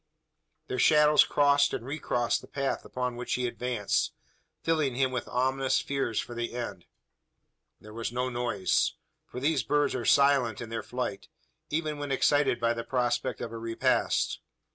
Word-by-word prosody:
Their 130 Hz, -, -4 dB
shadows 150 Hz, -1 st, +6 dB
crossed 145 Hz, 0 st, +3 dB
and 115 Hz, -, -6 dB
recrossed 120 Hz, -4 st, -1 dB
the -, -, -13 dB
track 140 Hz, -1 st, -2 dB
upon 125 Hz, -1 st, -3 dB
which 125 Hz, -, -2 dB
he 125 Hz, -, -1 dB
advanced 120 Hz, -3 st, -1 dB, 0.5 s
filling 155 Hz, -6 st, +1 dB
him 130 Hz, 0 st, +1 dB
with 125 Hz, -1 st, -3 dB
ominous 130 Hz, +1 st, +1 dB
fears 135 Hz, -6 st, -1 dB
for 120 Hz, -, -5 dB
the 120 Hz, 0 st, -4 dB
end. 120 Hz, -1 st, -5 dB, 0.9 s
There 105 Hz, 0 st, -13 dB
was 115 Hz, 0 st, -4 dB
no 125 Hz, +1 st, -1 dB
noise: 120 Hz, -6 st, 0 dB, 0.3 s
for 125 Hz, -, -7 dB
these 145 Hz, +1 st, +1 dB
birds 145 Hz, 0 st, +1 dB
are 125 Hz, -, -3 dB
silent 140 Hz, -6 st, +4 dB
in 115 Hz, -, -6 dB
their 115 Hz, -1 st, -3 dB
flight 125 Hz, -4 st, -4 dB, 0.4 s
even 155 Hz, -1 st, -2 dB
when 145 Hz, -1 st, -4 dB
excited 140 Hz, -1 st, +2 dB
by 115 Hz, 0 st, +2 dB
the 115 Hz, 0 st, -4 dB
prospect 120 Hz, -1 st, -1 dB
of 115 Hz, -, -4 dB
a 115 Hz, -, -6 dB
repast. 115 Hz, 0 st, 0 dB
125 Hz, 165 wpm, -28 LUFS, 120-140 Hz, 0.9 s, shadows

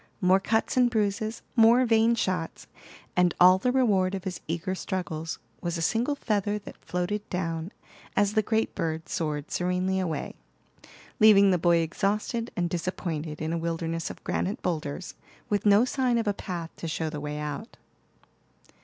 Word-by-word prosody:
More 185 Hz, +1 st, +4 dB
cuts 220 Hz, +5 st, 0 dB
and 250 Hz, -1 st, +5 dB
bruises, 215 Hz, 0 st, -1 dB
more 235 Hz, +2 st, +6 dB
vain 225 Hz, 0 st, +4 dB
shots, 185 Hz, -7 st, -2 dB, 0.5 s
and 180 Hz, -1 st, +3 dB
all 185 Hz, +1 st, +7 dB
the 250 Hz, -, +1 dB
reward 200 Hz, -8 st, +2 dB
of 190 Hz, -, -5 dB
his 190 Hz, -3 st, -5 dB
eager 170 Hz, +3 st, -2 dB
struggles 165 Hz, -4 st, -4 dB, 0.2 s
was 170 Hz, 0 st, -2 dB
a -, -, -3 dB
single 235 Hz, -, +1 dB
feather 210 Hz, -5 st, -1 dB
that 210 Hz, -, -12 dB
floated 195 Hz, +4 st, -3 dB
down 165 Hz, -1 st, -3 dB, 0.5 s
as 205 Hz, 0 st, +3 dB
the 215 Hz, -, +3 dB
great 220 Hz, +1 st, 0 dB
bird 160 Hz, 0 st, -3 dB
soared 150 Hz, -2 st, -3 dB
serenely 180 Hz, +1 st, 0 dB
away, 165 Hz, -6 st, -3 dB, 0.9 s
leaving 200 Hz, -2 st, +7 dB
the 180 Hz, -, +2 dB
boy 170 Hz, 0 st, +4 dB
exhausted 210 Hz, +7 st, -1 dB
and 175 Hz, -1 st, 0 dB
disappointed 165 Hz, -3 st, -3 dB
in 160 Hz, +1 st, -2 dB
a 170 Hz, -, -1 dB
wilderness 165 Hz, 0 st, -2 dB
of -, -, -10 dB
granite 195 Hz, +3 st, -2 dB
boulders, 160 Hz, 0 st, -3 dB, 0.4 s
with 205 Hz, -1 st, +1 dB
no 205 Hz, +4 st, +6 dB
sign 255 Hz, -2 st, +1 dB
of 230 Hz, -2 st, -1 dB
a 205 Hz, -, +2 dB
path 175 Hz, -4 st, -5 dB
to 165 Hz, -, -5 dB
show 160 Hz, 0 st, -2 dB
the 150 Hz, -2 st, -5 dB
way 150 Hz, 0 st, -4 dB
out. 150 Hz, -, -6 dB
185 Hz, 165 wpm, -27 LUFS, 165-215 Hz, 0.9 s, all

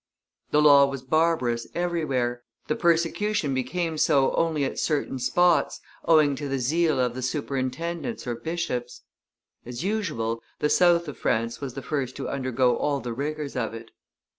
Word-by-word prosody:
The 150 Hz, 0 st, +3 dB
law 140 Hz, -2 st, +7 dB
was 135 Hz, -2 st, -6 dB
barbarous 130 Hz, -5 st, +1 dB
everywhere, 140 Hz, -9 st, -1 dB, 0.2 s
the 155 Hz, -, -1 dB
persecution 170 Hz, -1 st, +1 dB
became 160 Hz, +5 st, -2 dB
so 140 Hz, -4 st, +3 dB
only 160 Hz, -4 st, +1 dB
at -, -, -4 dB
certain 145 Hz, -4 st, -1 dB
spots, 160 Hz, +5 st, +2 dB, 0.3 s
owing 155 Hz, -4 st, +4 dB
to 145 Hz, 0 st, -4 dB
the 135 Hz, -, -1 dB
zeal 155 Hz, +4 st, +1 dB
of 125 Hz, -2 st, +1 dB
the 130 Hz, -, -6 dB
superintendents 145 Hz, -, -3 dB
or 120 Hz, -, -2 dB
bishops; 125 Hz, -3 st, -4 dB, 0.6 s
as 125 Hz, +5 st, -6 dB
usual, 155 Hz, -, -2 dB, 0.2 s
the 150 Hz, -, 0 dB
south 170 Hz, -1 st, +4 dB
of 145 Hz, -, -8 dB
France 115 Hz, +2 st, -1 dB
was 135 Hz, -3 st, -5 dB
the 135 Hz, -, -6 dB
first 135 Hz, -4 st, -3 dB
to -, -, -5 dB
undergo 130 Hz, -2 st, +1 dB
all 145 Hz, -1 st, 0 dB
the 120 Hz, -3 st, -5 dB
rigors 145 Hz, +3 st, -4 dB
of 115 Hz, -3 st, -2 dB
it. 115 Hz, 0 st, -10 dB
140 Hz, 160 wpm, -25 LUFS, 125-165 Hz, 0.6 s, law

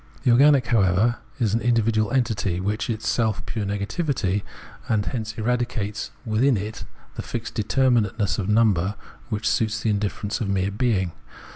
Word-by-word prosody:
The 125 Hz, -, +4 dB
organic, 135 Hz, +1 st, +6 dB
however, 110 Hz, +1 st, +2 dB, 0.2 s
is 110 Hz, -5 st, +1 dB
an 115 Hz, -, +1 dB
individual 115 Hz, -2 st, +2 dB
entity, 110 Hz, -8 st, 0 dB
which 105 Hz, +6 st, -2 dB
is 115 Hz, -, +1 dB
itself 110 Hz, -1 st, -1 dB
pure 110 Hz, -3 st, -3 dB
negativity, 100 Hz, -, -1 dB, 0.5 s
and 105 Hz, -3 st, +1 dB
hence 110 Hz, -3 st, -4 dB
eradicates 110 Hz, -3 st, -2 dB, 0.2 s
within 115 Hz, +3 st, +2 dB
it 105 Hz, +3 st, -5 dB, 0.3 s
the -, -, -5 dB
fixed 115 Hz, -1 st, -5 dB
determinateness 110 Hz, -3 st, +1 dB
of 95 Hz, 0 st, -2 dB
number, 105 Hz, -3 st, +3 dB, 0.3 s
which 105 Hz, -1 st, -2 dB
suits 110 Hz, 0 st, +1 dB
the 110 Hz, -, +1 dB
indifference 105 Hz, +2 st, -2 dB
of 100 Hz, -, -1 dB
mere 95 Hz, 0 st, 0 dB
being. 100 Hz, -5 st, 0 dB
110 Hz, 150 wpm, -24 LUFS, 100-120 Hz, 0.5 s, organic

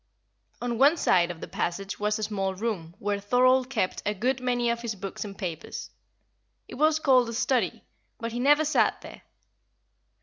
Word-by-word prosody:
On 240 Hz, -1 st, -2 dB
one 290 Hz, +5 st, +6 dB
side 175 Hz, -, +3 dB
of 175 Hz, -2 st, -7 dB
the -, -, -6 dB
passage 195 Hz, +3 st, -3 dB
was 210 Hz, 0 st, 0 dB
a 215 Hz, -, -4 dB
small 195 Hz, -2 st, -2 dB
room 185 Hz, -6 st, -4 dB
where 205 Hz, 0 st, -2 dB
Thorold 255 Hz, +4 st, +3 dB
kept 185 Hz, -8 st, -1 dB
a 210 Hz, +1 st, -1 dB
good 250 Hz, +6 st, 0 dB
many 245 Hz, -1 st, +1 dB
of 235 Hz, 0 st, -3 dB
his 230 Hz, -2 st, -3 dB
books 195 Hz, 0 st, -6 dB
and 200 Hz, -2 st, -9 dB
papers. 170 Hz, -5 st, -6 dB, 0.8 s
It -, -, -11 dB
was 310 Hz, +3 st, +3 dB
called 260 Hz, -5 st, +4 dB
the 230 Hz, -, -5 dB
study, 255 Hz, +1 st, 0 dB, 0.3 s
but 230 Hz, -1 st, -4 dB
he 240 Hz, -, -4 dB
never 295 Hz, +4 st, +4 dB
sat 305 Hz, -, +2 dB
there. -, -, -11 dB
230 Hz, 180 wpm, -27 LUFS, 195-255 Hz, 0.8 s, one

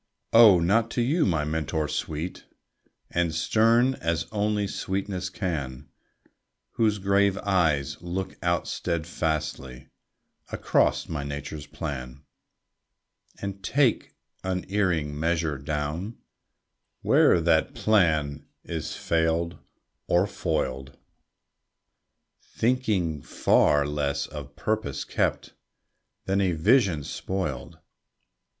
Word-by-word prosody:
Oh, 110 Hz, -6 st, +8 dB
not 105 Hz, +7 st, +2 dB
to -, -, +3 dB
you, 150 Hz, +5 st, +2 dB
my 80 Hz, -5 st, +1 dB
mentor 80 Hz, 0 st, -1 dB
sweet, 80 Hz, +4 st, -4 dB, 0.7 s
And 85 Hz, -2 st, 0 dB
stern 115 Hz, +8 st, +3 dB
as 85 Hz, -6 st, -1 dB
only 105 Hz, -1 st, 0 dB
sweetness 95 Hz, -1 st, -3 dB
can, 70 Hz, -7 st, -4 dB, 0.8 s
Whose 110 Hz, -2 st, +1 dB
grave 100 Hz, 0 st, +2 dB
eyes 80 Hz, -10 st, +1 dB
look 90 Hz, +2 st, -4 dB
out 85 Hz, -1 st, 0 dB
steadfastly 80 Hz, -6 st, -3 dB, 0.6 s
Across -, -, +1 dB
my 75 Hz, -3 st, -4 dB
nature's 70 Hz, +1 st, -6 dB
plan, 70 Hz, -3 st, -6 dB, 1.2 s
And 100 Hz, -1 st, -5 dB
take 130 Hz, +1 st, +1 dB, 0.3 s
unerring 90 Hz, -5 st, -1 dB
measure 80 Hz, -3 st, 0 dB
down 75 Hz, -, -3 dB, 0.9 s
Where'er -, -, +5 dB
that 80 Hz, -1 st, +2 dB
plan 80 Hz, -9 st, +1 dB, 0.2 s
is 80 Hz, -3 st, -4 dB
failed 85 Hz, +1 st, 0 dB, 0.5 s
or 90 Hz, +2 st, +3 dB
foiled, 70 Hz, -8 st, -3 dB, 1.4 s
Thinking 105 Hz, -, 0 dB
far 75 Hz, +1 st, +3 dB
less 75 Hz, -1 st, -1 dB
of 75 Hz, -2 st, -9 dB
purpose 110 Hz, -11 st, -2 dB
kept -, -, -1 dB, 0.7 s
Than 95 Hz, +1 st, +1 dB
of 95 Hz, -, +2 dB
a -, -, +1 dB
vision 95 Hz, -, +3 dB
spoiled. 75 Hz, -8 st, -4 dB
85 Hz, 95 wpm, -26 LUFS, 75-100 Hz, 1.4 s, Oh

